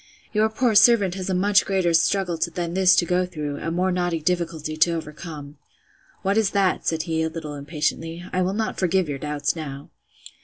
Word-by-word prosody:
Your 215 +1 +3
poor 235 +1 +1
servant 210 -3 +5
has 190 0 -5
a 185 - 0
much 200 +2 +3
greater 185 -3 0
struggle 175 0 +1 0.2
than 170 -1 -3
this 185 0 +5
to 175 - +3
go 180 +1 +1
through, 150 -4 -5
a 165 - -4
more 180 +3 0
knotty 175 -2 -1
difficulty 165 -2 -2
to 170 +2 +3
overcome. 150 -2 -8 0.6
What 200 +3 +2
is 215 -3 +2
that? 190 -2 +1
said 160 -1 0
he, 160 -1 -1
a 160 - 0
little 160 -2 -7
impatiently: 155 +3 -3
I 185 - +1
will 185 +1 0
not 220 0 -2
forgive 185 -1 +1
your 140 -2 -4
doubts 150 +1 -2
now. 140 -3 -7
175 Hz, 195 wpm, -23 LUFS, 155-190 Hz, 0.6 s, servant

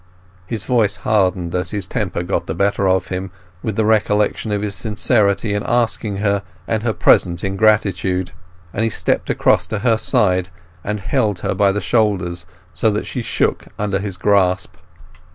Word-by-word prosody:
His 110 -1 -3
voice 110 -6 +2
hardened 95 -5 +1
as 90 0 -1
his 100 -4 -3
temper 95 -4 -2
got 90 - -2
the 80 - -3
better 100 +1 +1
of 95 0 +1
him 95 +1 -3 0.3
with 110 -3 -3
the 110 - +1
recollection 105 0 +1
of 105 0 -1
his 105 -1 -2
sincerity 105 -1 +1
in 105 - -1
asking 115 -4 0
her 100 0 +1 0.3
and 110 -1 0
her 115 0 0
present 85 -4 +3
ingratitude, 95 -3 +1 0.4
and 105 - -2
he 115 - +2
stepped - - -1
across - - +2
to 110 - -3
her 115 -2 +4
side 95 -4 +1 0.3
and 105 0 -3
held 100 -1 0
her - - -1
by 100 -1 +3
the 105 +1 -2
shoulders, 90 -4 0 0.3
so 110 - +2
that 105 0 -2
she 125 - -4
shook - - -1
under 100 -2 -1
his 100 -2 -5
grasp. 95 -3 +1
100 Hz, 170 wpm, -19 LUFS, 95-110 Hz, 0.4 s, her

